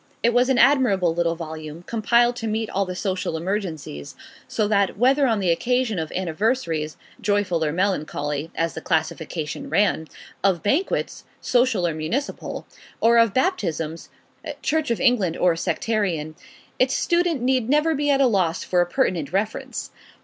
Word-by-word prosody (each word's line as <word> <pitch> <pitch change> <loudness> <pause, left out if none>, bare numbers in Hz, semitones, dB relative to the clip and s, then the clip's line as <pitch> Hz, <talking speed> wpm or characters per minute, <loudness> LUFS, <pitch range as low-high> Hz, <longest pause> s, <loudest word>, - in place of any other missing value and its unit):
It 235 - +3
was 245 +2 +3
an 265 - +3
admirable 240 - +4
little 170 0 0
volume, 160 0 -7
compiled 235 +3 +2
to 225 - -4
meet 220 0 -2
all 195 0 0
the 180 0 -5
social 185 -4 -2
emergencies; 165 - -4 0.3
so 215 - 0
that, 200 -2 +1
whether 270 +4 +4
on 225 -3 +1
the 185 -3 +2
occasion 245 +2 0
of 160 -1 -4
Anniversaries, 170 -3 -1 0.2
joyful 205 -6 +1
or 150 - 0
melancholy 155 -4 -1
(as 165 0 -1
the 160 - -6
classification 160 - -2
ran), 200 - +1 0.4
of 190 -4 +2
Banquets, 295 - 0 0.2
social 245 -7 +2
or 170 - 0
municipal, 185 - -4 0.3
or 235 +1 +5
of 230 -2 +4
Baptisms, 170 - -1 0.5
Church 315 -1 0
of 235 - 0
England 230 -10 +2
or 175 -2 +3
sectarian, 170 -5 -1 0.5
its 255 +1 +3
student 340 -6 +1
need 255 -2 +1
never 300 +3 +3
be 290 0 0
at 275 -1 +3
a 275 - +5
loss 190 -7 +1
for 180 -1 +2
a 175 - +1
pertinent 175 - 0
reference. 205 +3 -3
200 Hz, 155 wpm, -23 LUFS, 165-245 Hz, 0.5 s, or